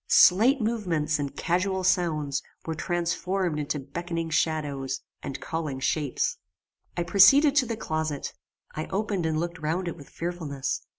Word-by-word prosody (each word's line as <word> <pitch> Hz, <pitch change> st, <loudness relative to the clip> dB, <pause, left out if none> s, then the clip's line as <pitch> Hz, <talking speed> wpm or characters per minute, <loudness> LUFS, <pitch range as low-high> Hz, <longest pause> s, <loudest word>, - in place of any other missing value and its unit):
Slight 235 Hz, +10 st, +6 dB
movements 175 Hz, -10 st, 0 dB
and 140 Hz, -1 st, -4 dB
casual 185 Hz, +2 st, 0 dB
sounds 155 Hz, -6 st, +1 dB, 0.2 s
were 160 Hz, -, -2 dB
transformed 175 Hz, +1 st, -1 dB
into 150 Hz, 0 st, -2 dB
beckoning 165 Hz, +4 st, -4 dB
shadows 145 Hz, -4 st, -1 dB, 0.2 s
and 140 Hz, -, -5 dB
calling 155 Hz, -5 st, -3 dB
shapes. 140 Hz, 0 st, 0 dB, 0.6 s
I 175 Hz, -, +1 dB
proceeded 275 Hz, -, +6 dB
to 255 Hz, -4 st, +4 dB
the 230 Hz, -1 st, -3 dB
closet. 155 Hz, -6 st, -3 dB, 0.4 s
I 155 Hz, -, -3 dB
opened 195 Hz, -3 st, -1 dB
and 155 Hz, -1 st, 0 dB
looked 170 Hz, +1 st, -3 dB
round 165 Hz, +4 st, -1 dB
it 170 Hz, -, -3 dB
with 145 Hz, -4 st, -13 dB
fearfulness. 165 Hz, -6 st, -3 dB
165 Hz, 140 wpm, -27 LUFS, 150-185 Hz, 0.6 s, Slight